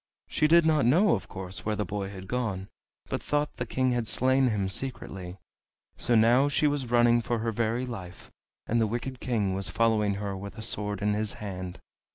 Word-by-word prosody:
She 155 - +2
did 170 +1 +6
not 155 -6 +3
know, 180 - +5
of 100 - -2
course, 95 0 -7
where 110 0 -1
the 105 - -2
boy 100 +2 -4
had 95 -1 -9
gone, 100 -5 -2 0.4
but - - -3
thought 150 0 -1
the 125 - -3
King 130 +2 +1
had 120 -2 -1
slain 130 +3 +3
him 105 -5 0
secretly. 95 -5 -5 0.6
So 120 - +2
now 120 +5 +5
she 145 - +1
was 145 -4 0
running 120 0 +4
for 120 +1 -1
her 115 +1 -1
very 115 +3 -1
life, 95 -7 -8 0.3
and 115 +1 +1
the 110 - +2
wicked 120 +3 -4
King 105 -7 0
was 95 +1 -3
following 110 -3 +2
her 100 -1 -4
with 100 +1 -8
a 110 - -4
sword 105 -2 -1
in 105 0 +2
his 105 0 +1
hand. 95 -3 -6
110 Hz, 205 wpm, -28 LUFS, 100-125 Hz, 0.6 s, did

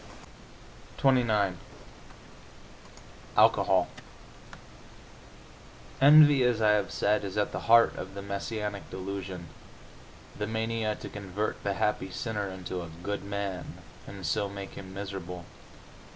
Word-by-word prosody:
XXIX 110 -8 +3 1.8
ALCOHOL - - +4 2.1
Envy, 145 -1 +8
as 120 -2 +2
I 105 -1 +4
have 105 -3 +2
said, 105 0 +1
is 100 0 -5
at 105 - +1
the - - -3
heart 115 0 +7
of 95 +1 -7
the 100 - -6
messianic 100 +1 -4
delusion, 95 -2 -6 0.9
the 105 - -3
mania 110 -1 -1
to - - -8
convert 105 +1 -4
the 100 -1 -1
happy 105 -2 0
sinner 105 +1 -3
into 95 -1 -5
a 85 - -7
"good" 100 0 -3
man, 100 -3 -4 0.3
and 95 -2 -8
so 100 +6 0
make 100 -1 -7
him 95 -1 -10
miserable. 95 -3 -6
100 Hz, 115 wpm, -29 LUFS, 95-110 Hz, 2.1 s, Envy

